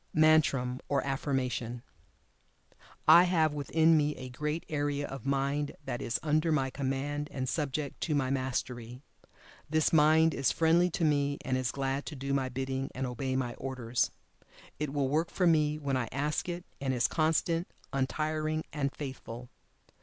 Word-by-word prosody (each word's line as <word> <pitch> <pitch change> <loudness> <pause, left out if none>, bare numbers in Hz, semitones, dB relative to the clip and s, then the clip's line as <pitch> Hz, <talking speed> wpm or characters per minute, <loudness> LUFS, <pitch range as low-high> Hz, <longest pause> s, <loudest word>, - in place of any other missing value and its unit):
MANTRAM 140 -5 +4
(OR 140 -1 +1
AFFIRMATION). 130 -3 -2 1.2
I 175 +1 +9
have 160 -4 +2
within 160 +3 +3
me 150 -1 +2
a 130 - -7
great 150 +6 -3
area 145 -2 -1
of 135 -1 -7
Mind 140 +1 0
that 120 - -3
is 115 - -1
under 155 +1 +2
my 135 -4 +1
command, 140 +2 -2
and 130 -2 -3
subject 145 0 -2
to 155 - 0
my 135 -2 +1
Mastery. 125 -2 -3 0.7
This 155 +1 +2
Mind 160 +1 +5
is 135 - +1
friendly 170 +2 +3
to 165 -1 -1
me, 145 -1 +2
and 130 - 0
is 130 -2 0
glad 135 0 -2
to 155 - -5
do 140 +1 -3
my 135 -2 0
bidding, 135 +1 -3
and 130 - -2
obey 130 +1 -2
my 125 -2 -1
orders. 125 -3 -1 0.7
It 150 -2 -2
will 140 -2 0
work 155 +5 +1
for 185 - 0
me 155 -3 +3
when 140 -3 -1
I 125 -3 -1
ask 150 +6 -1
it, 175 +1 -5 0.2
and 135 -2 0
is 120 - +3
constant, 165 +2 +1 0.3
untiring, 155 +3 -1
and 140 -3 -1
faithful. 125 -4 -7
140 Hz, 160 wpm, -30 LUFS, 130-155 Hz, 1.2 s, I